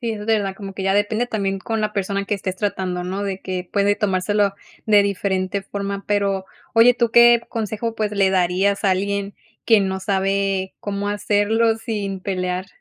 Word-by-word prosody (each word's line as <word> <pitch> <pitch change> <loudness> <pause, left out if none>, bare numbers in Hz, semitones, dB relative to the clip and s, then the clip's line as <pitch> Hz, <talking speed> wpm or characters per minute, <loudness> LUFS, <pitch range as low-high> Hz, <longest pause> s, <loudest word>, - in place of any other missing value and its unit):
Sí, 235 -2 -2
es 210 -1 -5
verdad, 205 -4 0
como 195 -2 -8
que 195 - -5
ya 195 +1 +1
depende 215 +3 +1
también 195 -3 -2
con 225 +1 -2
la 215 0 -1
persona 200 0 -2
que 205 - -1
estés 190 -1 -4
tratando, 185 -3 -2
¿no? 190 +3 -3
De 195 -1 -3
que 185 -1 -5
puede 205 0 +2
tomárselo 200 0 +1 0.3
de 210 -2 +5
diferente 195 0 -1
forma, 200 0 -5
pero, 200 -2 0 0.3
oye 230 +2 +7
¿tú 235 -2 +1
qué 235 0 +7
consejo, 225 0 -3
pues, 215 -2 -1
le 195 -2 +2
darías 190 +2 +1
a 195 - +3
alguien 200 +1 -1 0.3
que 225 -3 +5
no 190 0 -2
sabe 195 -1 0
cómo 205 0 -3
hacerlo 210 +2 +1
sin 210 -4 -4
pelear? 185 -1 -3
200 Hz, 185 wpm, -21 LUFS, 190-210 Hz, 0.3 s, oye